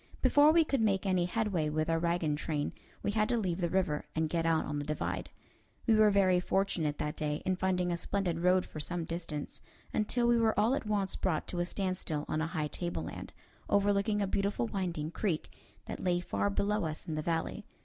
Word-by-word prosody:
Before 290 +1 +6
we 330 0 +5
could 275 -5 0
make 200 -3 +2
any 185 -2 +2
headway 180 -5 0
with 155 +1 0
our 165 0 +1
wagon 170 -3 +1
train 150 -1 -2 0.3
we - - +1
had 215 +1 +1
to 240 - +2
leave 185 -4 -1
the 170 - +1
river 180 -5 0
and 160 0 +1
get 165 -1 +1
out 160 -1 +2
on 145 0 -3
the - - -2
divide. 150 +1 -3 0.6
We 230 - +4
were 215 -1 +6
very 190 -3 +4
fortunate 180 -5 0
that 150 +1 -2
day 150 0 -2
in 185 - +2
finding 180 -1 0
a 170 - 0
splendid 175 -2 -1
road 180 +1 +3
for 155 - -8
some 170 +2 -3
distance, 165 -3 -5 0.3
until 235 +3 +1
we 235 0 +4
were 220 -2 +2
all 220 +5 +3
at 245 - -2
once 200 -2 +1
brought 175 -5 -1
to 175 - -2
a 175 - +1
standstill 180 -5 -2
on 155 - -1
a 160 - 0
high 160 -3 -2
tableland, 175 +2 -5 0.4
overlooking 205 +1 +2
a - - +2
beautiful 195 -9 0
winding 165 - -3
creek 175 -4 -2 0.3
that - - -6
lay 175 -1 +2
far 100 - -1
below 205 - 0
us 155 -1 -5
in 160 - -3
the 155 - -1
valley. 165 +1 -2
180 Hz, 210 wpm, -32 LUFS, 160-200 Hz, 0.6 s, Before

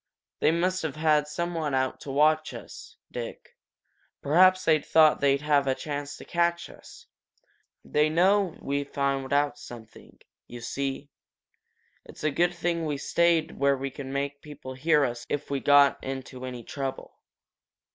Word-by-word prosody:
"They - - +3
must 180 +3 0
have 160 -4 -4
had 155 -1 +2
some 170 +3 -3
one 155 -4 -2
out 130 0 -1
to - - -9
watch 155 +2 +2
us, - - -11
Dick 120 -1 -8 0.6
perhaps 185 +5 +4
they 155 -2 +4
thought 155 0 +4
they'd 140 0 +3
have 145 -2 +2
a 130 - +2
chance 145 0 -5
to - - -12
catch 170 0 0
us. - - -15 0.8
They 150 +1 +2
know 185 +2 +3
that - - -19
we've 140 0 -2
found 140 -1 -1
out 145 0 +1
something, 120 -5 -13 0.3
you 120 - -9
see! 135 +4 -4 0.9
It's - - -13
a 155 - +1
good 175 +4 +1
thing 170 -1 -1
we 145 -2 -2
stayed 165 +2 +1
where 140 0 +3
we 135 +1 -4
could 140 0 -8
make 140 +1 -3
people 145 -3 -9
hear 150 +2 +2
us 120 -1 -4
if 145 0 -3
we 140 - 0
got 145 0 +4
into 130 -1 -6
any 125 -2 -7
trouble." 135 +2 -6
145 Hz, 165 wpm, -27 LUFS, 135-160 Hz, 0.9 s, perhaps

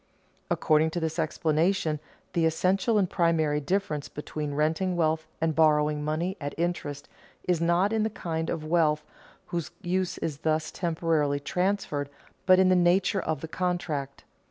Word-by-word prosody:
According 155 +1 +3
to 175 - -2
this 160 0 -2
explanation 160 +1 +1 0.3
the 165 -2 +3
essential 190 +7 +1
and 195 -3 +3
primary 165 -4 +1
difference 155 -2 -1
between 150 -1 -5
renting 160 +5 +1
wealth 160 -1 +1
and 160 0 +1
borrowing 150 -1 +3
money 165 +5 -1
at 145 0 -4
interest 160 -4 -3 0.4
is 175 -2 0
not 175 +5 +2
in 220 - +2
the 220 - +1
kind 165 -5 -3
of 155 -2 -3
wealth 155 -2 +2 0.4
whose 170 -3 -3
use 185 +1 -1
is 150 -3 -3
thus 155 0 0
temporarily 160 -4 0
transferred, 180 -3 -1 0.4
but 185 -1 +7
in 190 0 +5
the 185 - +5
nature 180 +2 +3
of 155 -4 -2
the 160 - -5
contract. 160 -6 -3
160 Hz, 155 wpm, -27 LUFS, 150-180 Hz, 0.4 s, but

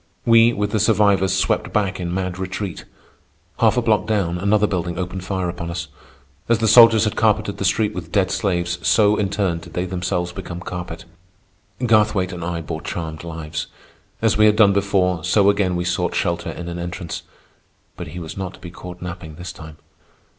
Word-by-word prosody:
We, 115 0 +6
with 105 -3 -2
the 110 - +1
survivors, 100 -3 +3
swept - - 0
back 100 -3 0
in 85 -1 -3
mad 90 0 -3
retreat. 95 0 -5 0.7
Half - - +4
a - - +2
block - - +2
down 95 -5 0
another 100 +2 +3
building 90 -3 -2
opened 90 0 -4
fire 95 -2 -2
on 85 - -4
us. 85 -1 -5 0.6
As 115 - +4
the 110 0 0
soldiers 115 -1 +8
had 105 - 0
carpeted 105 -2 +1
the 100 - -1
street 105 +2 +1
with 85 -2 -7
dead 95 -2 +2
slaves, 85 -3 -1
so, 105 +4 +4
in 105 -2 0
turn, 95 -4 -1
did - - -13
they 90 - -1
themselves 90 -1 -2
become 85 0 -7
carpet. 90 -2 -7 0.8
Garthwaite 105 -5 +3
and 85 -1 -6
I 85 0 -3
bore 80 - -5
charmed 80 -2 -5
lives. 80 -3 -5 0.6
As - - +2
we 105 - +7
had 105 - +4
done 105 -2 +5
before, 95 -4 +1
so 100 +2 +4
again 100 -3 0
we 90 0 -2
sought 90 0 -1
shelter 85 0 -1
in 85 - -6
an 85 0 -5
entrance. 85 0 -5 0.7
But - - -7
he 80 +4 -9
was 80 -1 -7
not 95 -1 -5
to - - -19
be 90 - -9
caught 90 0 -9
napping 85 -3 -7
this 90 0 -7
time. 80 -2 -11
90 Hz, 195 wpm, -21 LUFS, 85-100 Hz, 0.8 s, soldiers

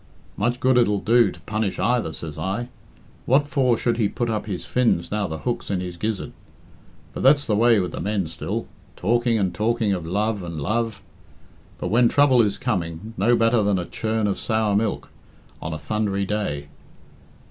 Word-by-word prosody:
"Much 120 +4 0
good 130 -1 +4
it'll 105 -4 +3
do 115 +1 +4
to - - -13
punish 110 -2 -2
either, 120 -9 +1
say 80 0 -6
I. 110 +6 -3 0.6
What 140 +3 +4
for 130 -5 +2
should 120 0 0
he 110 -4 +2
put 120 +1 -2
up 105 -1 -3
his 95 -4 -4
fins 115 -9 +1
now 105 -1 0
the 80 - -5
hook's 120 +7 -3
in 95 -2 0
his 90 -1 -5
gizzard? 105 +3 -3 0.8
But - - -5
that's 145 +2 +5
the 105 - +1
way 115 0 +5
with 90 -2 -2
the - - -6
men 100 -2 -1
still. 80 0 -4 0.3
Talking 120 +3 +1
and 95 -4 0
talking 110 -1 +1
of 90 -3 -3
love 105 +5 -1
and 85 -3 -6
love; 110 +5 -2 0.7
but - - -3
when 120 +4 +4
trouble 140 -4 +5
is 105 -3 +1
coming, 95 -2 -3
no 115 +5 +3
better 115 0 +3
than 100 -1 +2
a 90 - -2
churn 110 +2 -2
of 100 -2 -1
sour 110 -2 +1
cream 105 0 0 0.6
on 80 - -4
a 80 - -3
thundery 100 +2 -1
day. 95 -9 -2
105 Hz, 190 wpm, -23 LUFS, 95-120 Hz, 0.8 s, that's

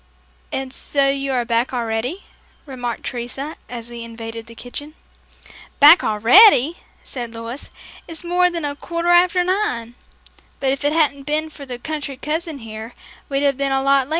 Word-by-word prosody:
"And 265 -1 -3
so 275 0 +1
you 275 0 -1
are 245 -2 0
back 235 +2 +1
already," 240 - -2 0.4
remarked 245 -5 -5
Teresa 265 +5 -5
as 240 -1 -7
we 235 -1 -7
invaded 230 0 -8
the 230 - -12
kitchen. 290 +6 -7 0.8
"Back 300 +5 +9
already!" 260 - +6 0.3
said 240 -3 -6
Louis. 230 +4 -7 0.4
"It's 330 +1 -5
more 360 +1 +3
than 335 -3 -3
a 285 0 -2
quarter 340 +3 -3
after 355 +1 +5
nine, 355 - -1 0.7
but 265 -1 +1
if 275 +1 -3
it 290 - +2
hadn't 285 -3 +1
been 310 +1 0
for 280 -2 -11
the 250 -1 -5
country 285 0 -5
cousin 315 +2 -3
here, 220 +2 -8 0.3
we'd 275 0 0
have 280 -2 +2
been 275 -1 0
a - - +2
whole 270 - 0
lot 275 -1 +4
later." - - -18
275 Hz, 175 wpm, -20 LUFS, 240-310 Hz, 0.8 s, Back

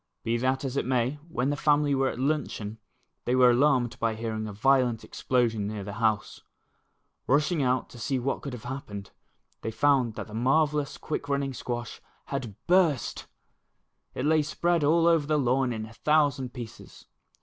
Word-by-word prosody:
Be 115 - 0
that 130 +3 0
as 135 +1 -3
it - - 0
may, 130 +2 0
when 135 -3 0
the - - 0
family 145 -1 +2
were 135 0 +2
at - - -6
luncheon, 125 -6 -2 0.5
they 125 - +1
were 125 -1 +6
alarmed 125 -2 +2
by 115 -1 0
hearing 110 -1 -3
a - - -5
violent 125 +1 +2
explosion 115 -5 0
near 105 -1 -4
the 100 +1 -6
house. 110 -2 0 0.9
Rushing 150 +4 +2
out 130 -1 +1
to 120 - -11
sec 130 +3 -1
what 135 +3 -1
could 140 - -6
have 120 - -8
happened, 110 -6 -7 0.5
they - - -3
found 130 -2 +2
that - - -5
the 105 - -13
marvellous 145 +5 +1
quick 145 -2 -4
running 140 -1 0
squash 120 0 -5 0.3
had 120 -7 -3
burst!! 175 -7 +2 0.9
It 130 - -2
lay 155 +1 +4
spread 170 +2 0
all 165 +3 +4
over 165 -4 +3
the 155 0 +2
lawn 130 -1 +1
in 110 -2 -4
a 110 - -13
thousand 145 -2 +1
pieces. 120 -4 -10
130 Hz, 175 wpm, -27 LUFS, 115-145 Hz, 0.9 s, were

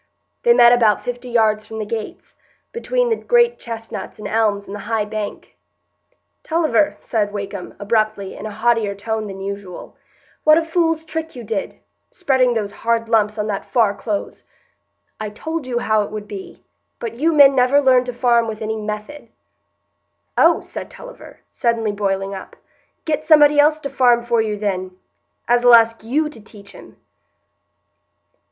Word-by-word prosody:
They 475 - +5
met 240 - +7
about 225 -4 +3
fifty 245 0 -6
yards 215 -2 +1
from 220 - -8
the 215 - -3
gates, 220 0 -7 0.4
between - - -1
the - - +3
great 475 +1 +2
chestnuts 225 -1 -7
and 210 - -7
elms 210 -2 0
and 195 - -9
the 205 - -6
high 220 -2 0
bank. 210 -1 -6 0.9
"Tulliver," 315 -2 +1
said 210 -3 -2
Wakem, 200 -2 -6
abruptly, 215 -2 -1
in - - -7
a - - -7
haughtier 220 -1 0
tone 220 +1 -3
than 195 -1 -8
usual, 200 -2 -7 0.5
"what 310 0 +6
a 335 - +2
fool's 325 -1 0
trick 320 -1 -5
you 245 - -8
did,—spreading 260 - -2
those 205 -3 -2
hard 230 +1 -1
lumps 215 -1 +2
on 210 - -1
that 205 -2 -3
Far 225 -5 +2
Close! 205 0 -5 0.8
I 215 -1 -4
told 315 +7 -5
you 245 -2 -2
how 215 -2 +1
it 205 - -4
would 210 -1 -7
be; 195 -11 -9 0.3
but 230 0 -7
you 325 +3 +2
men 285 -3 +7
never 260 +2 +4
learn 260 -3 +4
to 250 - -4
farm 235 -1 +2
with 220 0 -5
any 220 0 -2
method." 215 +7 -6 1.1
"Oh!" - - +4
said - - -8
Tulliver, - - -13
suddenly 230 -3 0
boiling 195 -1 -2
up; 190 - -9 0.5
"get 305 -1 -1
somebody 300 -2 +5
else 305 +1 +4
to 280 - -4
farm 240 -2 +3
for 235 -1 +1
you, 215 -1 -2
then, 185 -3 -3 0.5
as'll 240 0 +6
ask 230 -1 +3
you 290 +7 0
to 250 -7 -12
teach 205 -1 -13
him." - - -15
230 Hz, 165 wpm, -19 LUFS, 210-275 Hz, 1.1 s, met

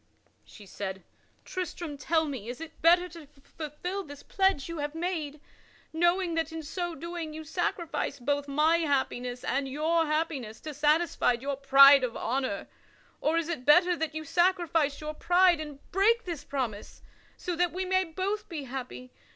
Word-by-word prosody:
She 210 - -14
said: 190 0 -6 0.4
"Tristram, 345 -4 -5
tell 320 +3 +1
me, 255 -7 -5
is 245 - -6
it 325 0 -10
better 350 +2 +5
to 325 -3 -12
fulfil 305 +6 -6
this 285 -4 -11
pledge 385 -8 +1
you 335 -2 -5
have 295 +1 -3
made, 325 -4 -3 0.5
knowing 345 +2 +2
that 325 -1 -1
in 320 0 -6
so 345 +2 -4
doing 330 0 -6
you 315 - -6
sacrifice 330 -2 -2
both 285 +3 -1
my 305 +4 +3
happiness 265 -5 -1
and 270 +1 -1
your 320 +4 +1
happiness 300 -8 -2
to 305 - -6
satisfy 300 -1 +2
your 275 +4 -3
pride 275 0 +7
of 240 -2 -2
honor; 250 -4 -2 0.5
or 320 +2 +2
is 335 -1 0
it 325 -7 -4
better 350 +5 +5
that 320 -2 -3
you 315 0 -4
sacrifice 335 -4 +1
your 305 0 -4
pride 355 +1 +4
and 295 -2 -7
break 450 +5 +3
this 335 -5 -5
promise 255 -8 -5 0.3
so 355 - -3
that 350 0 +1
we 370 +2 -3
may 375 0 +2
both 380 +5 -3
be 315 -5 -5
happy? 255 -1 -7
310 Hz, 165 wpm, -29 LUFS, 275-345 Hz, 0.5 s, pride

